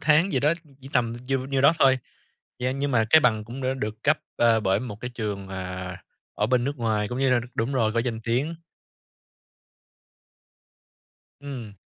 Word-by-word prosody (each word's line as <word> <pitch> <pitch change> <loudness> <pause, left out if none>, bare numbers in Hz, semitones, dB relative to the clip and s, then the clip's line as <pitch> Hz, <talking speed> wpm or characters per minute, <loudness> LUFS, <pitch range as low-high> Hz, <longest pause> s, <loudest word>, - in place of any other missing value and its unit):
tháng 155 +5 +4
gì 130 - +2
đó, 150 +2 +4 0.3
chỉ 135 - -10
tầm 115 -3 +1
diêu 135 -1 0
nhiêu 135 -1 0
đó 140 +4 +7
thôi. 130 -2 +5 0.6
Yeah, 125 +1 -1
nhưng 140 +1 -1
mà 115 -3 +3
cái 160 - +8
bằng 110 -5 +2
cũng 120 +4 -7
đã 130 +1 0
được 110 -3 -5
cấp, 155 +2 +3 0.2
ờ, 115 -1 +4
bởi 95 -1 +1
một 105 -4 -7
cái 125 - -5
trường, 100 -4 -4
ờ, 95 -1 -5 0.4
ở 105 - +1
bên 125 +1 +2
nước 140 +2 -2
ngoài 110 -4 0
cũng 125 - -4
như 135 -1 +2
là 125 -1 +4
đ - - -7
đúng 115 +5 -1
rồi, 115 -4 +2
có 115 - 0
danh 115 -2 -3
tiếng. 125 +8 -1 2.9
Ừm. 130 -7 -7
125 Hz, 190 wpm, -25 LUFS, 110-135 Hz, 2.9 s, cái